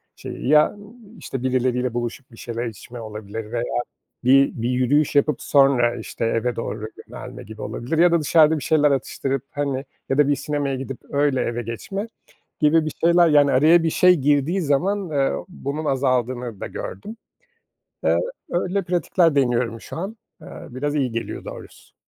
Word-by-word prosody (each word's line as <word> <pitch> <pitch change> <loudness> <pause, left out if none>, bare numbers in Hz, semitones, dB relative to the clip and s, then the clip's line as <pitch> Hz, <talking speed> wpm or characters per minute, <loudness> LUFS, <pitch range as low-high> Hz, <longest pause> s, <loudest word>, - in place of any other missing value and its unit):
şeyi, - - -7
ya, 150 0 +6
ııı, 205 +2 -14 0.2
işte, 130 -1 -6
birileriyle 125 -1 0
buluşup 120 +2 -4
bir 115 - -15
şeyler 120 0 -4
içme 115 +2 -8
olabilir 110 0 -7
veya 120 0 -1 0.6
bir 135 +2 +5
bir 120 - 0
yürüyüş 135 +4 +2
yapıp 145 0 +2
sonra, 135 -4 +4
işte, 115 0 -5
eve 115 +1 0
doğru 110 -1 -4 0.2
yönelme - - -9
gibi 110 +1 -10
olabilir 145 +7 -3
ya 175 0 +5
da 170 - +3
dışarıda 155 +1 +4
bir - - -8
şeyler 150 -2 +3
atıştırıp, 135 0 -2
hani, 140 -2 -2 0.2
ya 135 - 0
da 145 -1 +5
bir 145 - +2
sinemaya 145 -2 -2
gidip 135 0 -6
öyle 140 -2 +1
eve 120 0 -2
geçme 195 - -5 0.5
gibi 155 +1 +4
bir 155 - -3
şeyler, 170 0 +5
yani, 145 -2 +5
araya 155 +6 +5
bir 165 - +1
şey 180 +3 +5
girdiği 145 +6 +1
zaman, 180 +5 0
eee, 140 -2 +1 0.2
bunun 155 -3 -5
azaldığını 125 -4 -1
da - - -4
gördüm. 215 - -7 0.9
Eee, - - +3 0.3
öyle 185 +3 -1
pratikler 175 -2 +2
deniyorum 120 -3 +1
şu - - -8
an, 200 +6 -5 0.2
eee, - - -12 0.2
biraz 145 +4 -3
iyi 130 -5 0
geliyor 115 0 -5
doğrusu. - - -11
135 Hz, 170 wpm, -22 LUFS, 120-155 Hz, 0.9 s, ya